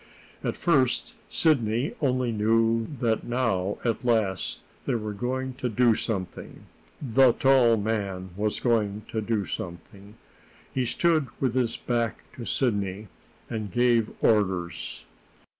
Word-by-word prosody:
At - - -2
first 135 -8 +1
Sidney 125 -4 +2
only 130 -3 +1
knew 115 +1 +2
that 115 -2 +1
now, 110 -6 0
at 115 +1 0
last, 100 - 0 0.2
they - - +1
were 110 -2 -3
going 130 +4 -2
to 125 - -1
do 120 +1 +4
something 105 -4 -4 0.4
the 130 -2 +4
tall 130 -4 +4
man 100 -4 -2
was 105 +1 -1
going 110 -3 +1
to 110 - -2
do 105 -2 -1
something. 95 +5 -8 0.6
He 130 -1 0
stood 155 +4 +2
with 130 -4 +1
his 125 -3 0
back 120 -2 -1
to 120 - -7
Sidney, 105 -5 -1 0.4
and 110 -3 -4
gave 120 -2 +3
orders. 95 -6 0
115 Hz, 125 wpm, -26 LUFS, 105-125 Hz, 0.6 s, do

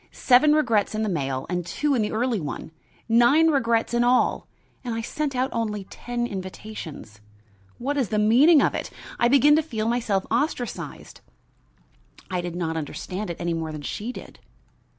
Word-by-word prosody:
Seven 270 +4 +4
regrets 230 -9 +2
in 215 - -1
this 215 - -1
mail 135 -5 -2
and 180 -1 -2
two 285 - -1
in 245 - +2
the 210 - -1
early 235 0 0
one. 155 0 -6 0.4
Nine 240 +8 +5
regrets 230 -5 +1
in 240 0 +3
all! 245 +1 +2 0.4
and 240 -3 -3
I 230 - -2
sent 290 +3 -3
out 255 +1 0
only 215 -3 -2
ten 240 0 -3
invitations. 185 - -8 0.6
What 280 +4 -2
is 255 -8 0
the 215 - -1
meaning 265 +9 +6
of - - +1
it? - - -4 0.3
I 240 - +4
begin 280 +3 +5
to - - +3
feel 225 -8 -3
myself 230 -5 0
ostracized." 245 0 -3 1.1
I 180 -1 -1
did 175 -1 -5
not 165 -2 -2
understand 180 +6 -5
it 170 - -5
any 170 0 -1
more 160 -1 -3
than 150 -1 -7
she 215 +10 -4
did. - - -11
225 Hz, 175 wpm, -24 LUFS, 185-250 Hz, 1.1 s, meaning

